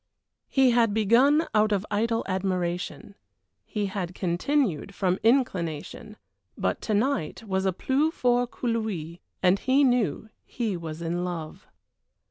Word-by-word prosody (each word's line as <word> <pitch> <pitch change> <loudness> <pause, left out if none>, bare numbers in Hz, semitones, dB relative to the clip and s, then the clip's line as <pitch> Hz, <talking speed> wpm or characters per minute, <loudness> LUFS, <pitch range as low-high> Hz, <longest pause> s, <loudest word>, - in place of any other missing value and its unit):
He 265 -2 +4
had 230 -3 +3
begun 255 +9 +4
out 215 0 +3
of 200 -1 0
idle 225 +2 0
admiration; 185 0 -2 0.5
he 210 -1 -2
had 190 -2 -4
continued 195 - 0
from 185 -1 0
inclination; 215 - 0 0.4
but - - -1
to 215 - -1
night 225 - -1
it - - -14
was 190 0 0
plus 290 +4 +1
fort 245 -4 +1
que 250 - -5
lui, 195 -8 -2 0.2
and 185 +2 +4
he 265 +2 +3
knew 230 - +1
he 225 -5 -3
was 165 -1 -6
in 175 +2 -2
love. 170 -3 -6
205 Hz, 135 wpm, -26 LUFS, 180-240 Hz, 0.5 s, He